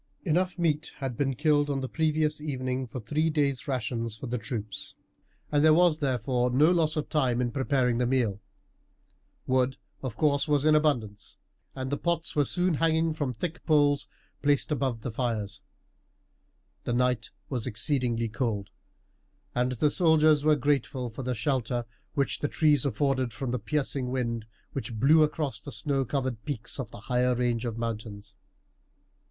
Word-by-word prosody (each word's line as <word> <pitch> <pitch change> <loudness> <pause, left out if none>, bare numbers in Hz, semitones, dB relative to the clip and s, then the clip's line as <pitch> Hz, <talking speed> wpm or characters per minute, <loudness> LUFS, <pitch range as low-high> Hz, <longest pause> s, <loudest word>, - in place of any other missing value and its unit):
Enough 180 +2 +1
meat 160 -3 0
had 135 -4 -4
been 135 +1 0
killed 145 +1 +2
on 140 -1 0
the 130 - -2
previous 155 0 0
evening 130 -3 -2
for 125 - -6
three 150 +8 0
days' 145 -4 0
rations 115 -3 -2
for - - -7
the 125 -1 -2
troops, 110 -4 -5 0.6
and 145 0 +3
there 155 0 +7
was 170 -2 +4
therefore 125 -2 0
no 145 +7 +4
loss 160 -3 +2
of 155 -2 -2
time 130 -6 +1
in 120 -1 0
preparing 130 -3 +1
the 125 - +2
meal. 115 -6 0 1.0
Wood, 130 0 +1 0.2
of 125 -5 -5
course, 145 -1 +2
was 145 -1 +2
in 155 - +6
abundance, 120 -10 0 0.4
and 130 0 -4
the 145 - -1
pots 170 -1 -1
were 145 -1 +3
soon 180 +4 +1
hanging 160 +1 +2
from 145 -4 -2
thick 160 +8 -5
poles 145 -2 +3 0.3
placed 145 +1 +2
above 130 -5 -1
the 125 - -4
fires. 110 -4 -2 1.2
The 120 - -2
night 125 -3 +1 0.2
was 125 -3 -3
exceedingly 120 -1 0
cold, 110 -4 -2 0.8
and 125 +1 +1
the 145 +5 +2
soldiers 155 -3 +4
were 155 0 +5
grateful 135 -3 0
for 115 - -7
the 125 -1 -2
shelter 120 0 -1 0.3
which 140 -1 0
the 145 - 0
trees 150 -3 +3
afforded 130 -1 0
from 120 +1 -3
the 125 - -1
piercing 135 +1 -1
wind 115 -3 -2 0.3
which 125 -4 -4
blew 145 +8 +5
across 150 -2 0
the 140 - -8
snow 135 -2 -1
covered 130 -3 -2
peaks 135 -3 -4
of 125 -5 -4
the - - -11
higher 125 0 +1
range 120 -1 0
of 115 -2 -3
mountains. 105 -3 -5
130 Hz, 165 wpm, -28 LUFS, 120-150 Hz, 1.2 s, there